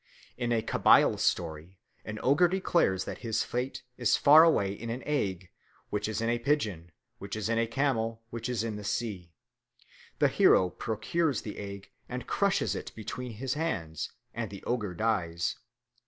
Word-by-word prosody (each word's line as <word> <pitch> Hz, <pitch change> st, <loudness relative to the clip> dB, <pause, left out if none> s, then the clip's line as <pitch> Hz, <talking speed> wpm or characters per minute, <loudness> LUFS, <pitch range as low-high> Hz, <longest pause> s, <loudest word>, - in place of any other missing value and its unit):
In 120 Hz, -1 st, -2 dB
a 115 Hz, -2 st, +1 dB
Kabyle -, -, +4 dB
story 85 Hz, +2 st, -1 dB, 0.3 s
an 105 Hz, 0 st, -6 dB
ogre 145 Hz, +7 st, +5 dB
declares 170 Hz, -, +1 dB
that -, -, -6 dB
his 115 Hz, -2 st, -1 dB
fate 125 Hz, +3 st, -3 dB
is 120 Hz, -3 st, +3 dB
far 150 Hz, +3 st, +8 dB
away 100 Hz, -12 st, +3 dB
in 115 Hz, +3 st, -7 dB
an 120 Hz, +3 st, -4 dB
egg, 95 Hz, -, -2 dB, 0.4 s
which 105 Hz, 0 st, -1 dB
is 110 Hz, 0 st, -2 dB
in 115 Hz, -, 0 dB
a 120 Hz, 0 st, +1 dB
pigeon, 110 Hz, -, -1 dB, 0.3 s
which 100 Hz, +1 st, -6 dB
is 110 Hz, 0 st, -2 dB
in 115 Hz, 0 st, +2 dB
a 115 Hz, -, +1 dB
camel, 115 Hz, -3 st, -1 dB
which 115 Hz, +1 st, -4 dB
is 120 Hz, -3 st, -1 dB
in 110 Hz, -2 st, -3 dB
the 105 Hz, -, -7 dB
sea. 100 Hz, -6 st, -3 dB, 0.9 s
The -, -, +4 dB
hero 90 Hz, -1 st, +4 dB
procures 130 Hz, +5 st, -1 dB
the 105 Hz, -, -6 dB
egg 100 Hz, -1 st, -8 dB, 0.2 s
and -, -, -5 dB
crushes -, -, +1 dB
it -, -, -6 dB
between 120 Hz, +2 st, -6 dB
his 130 Hz, +4 st, -3 dB
hands, 90 Hz, -, -3 dB, 0.2 s
and 115 Hz, -2 st, -3 dB
the 100 Hz, -1 st, -10 dB
ogre 105 Hz, -7 st, -2 dB
dies. 90 Hz, -5 st, 0 dB
110 Hz, 170 wpm, -29 LUFS, 100-125 Hz, 0.9 s, far